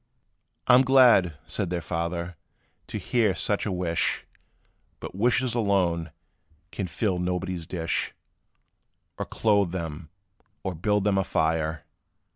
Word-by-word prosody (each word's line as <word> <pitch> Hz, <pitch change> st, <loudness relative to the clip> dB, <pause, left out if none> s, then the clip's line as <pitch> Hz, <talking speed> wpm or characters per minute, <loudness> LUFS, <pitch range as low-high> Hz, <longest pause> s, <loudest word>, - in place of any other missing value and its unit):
"I 125 Hz, -, +5 dB
'm 125 Hz, -, +8 dB
glad," 125 Hz, -, +5 dB
said 95 Hz, -, -3 dB
their 90 Hz, 0 st, -1 dB
father, 85 Hz, +2 st, -3 dB, 0.5 s
"to -, -, -4 dB
hear 110 Hz, -6 st, +1 dB
such 105 Hz, +2 st, 0 dB
a -, -, -1 dB
wish; 90 Hz, -2 st, 0 dB, 0.7 s
But -, -, -7 dB
wishes 120 Hz, +4 st, +1 dB
alone, 95 Hz, -7 st, +1 dB, 0.6 s
can 95 Hz, -, -3 dB
fill 90 Hz, +1 st, -1 dB
nobody's 90 Hz, -1 st, -2 dB
dish, 85 Hz, -2 st, -1 dB, 1.1 s
Or -, -, -2 dB
clothe 100 Hz, -5 st, +2 dB
them, 80 Hz, -3 st, -5 dB, 0.5 s
or 95 Hz, -, -2 dB
build 105 Hz, +5 st, 0 dB
them 100 Hz, -1 st, +2 dB
a -, -, +2 dB
fire. 80 Hz, -1 st, 0 dB
90 Hz, 125 wpm, -26 LUFS, 85-105 Hz, 1.1 s, m